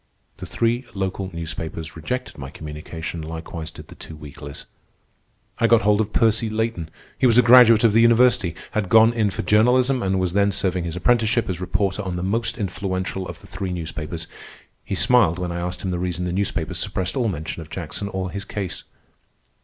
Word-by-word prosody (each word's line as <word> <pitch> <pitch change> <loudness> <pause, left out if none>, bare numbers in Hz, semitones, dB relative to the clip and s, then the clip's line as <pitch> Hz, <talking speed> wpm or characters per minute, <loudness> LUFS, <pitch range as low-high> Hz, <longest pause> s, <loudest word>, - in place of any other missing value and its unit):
The - - -8
three 120 +2 0
local 95 0 -3
newspapers 80 -1 -6
rejected 125 +11 -4
my 65 0 -6
communication, 80 +2 -7
likewise 80 0 -6
did - - -12
the - - -10
two 80 - -10
weeklies. 75 -1 -10 0.9
I 115 - +4
got 115 -3 +4
hold 105 +1 +3
of 105 -1 -3
Percy 115 0 +2
Layton. 110 -7 -2 0.3
He 130 - +5
was 115 -1 +4
a 125 - +7
graduate 115 -2 +7
of 115 -3 +5
the 115 - +5
university, 115 -6 +4 0.2
had 105 -4 -1
gone 115 +2 +6
in 110 -3 +1
for 95 - -4
journalism, 125 +6 +3
and 95 -1 0
was 90 -2 -1
then 100 0 +3
serving 95 -3 -1
his 85 -1 -4
apprenticeship 115 +3 +2
as 90 -1 -3
reporter 95 +2 -1
on 95 -3 -4
the 90 - -3
most 115 +4 -1
influential 95 -2 -3
of - - -9
the - - -16
three 95 -2 -4
newspapers. 80 -1 -5 0.6
He 95 - -3
smiled 95 -6 +4
when 90 -1 -3
I 85 - -3
asked 90 +1 -4
him 95 - -1
the 90 - -2
reason 90 0 -2
the 90 - -2
newspapers 95 -4 -1
suppressed 95 +4 -2
all 125 -4 +1
mention 85 -3 -4
of 80 - -11
Jackson 90 +4 -4
or 95 -1 -3
his 100 0 -5
case. 95 -2 -5
95 Hz, 195 wpm, -22 LUFS, 85-110 Hz, 0.9 s, a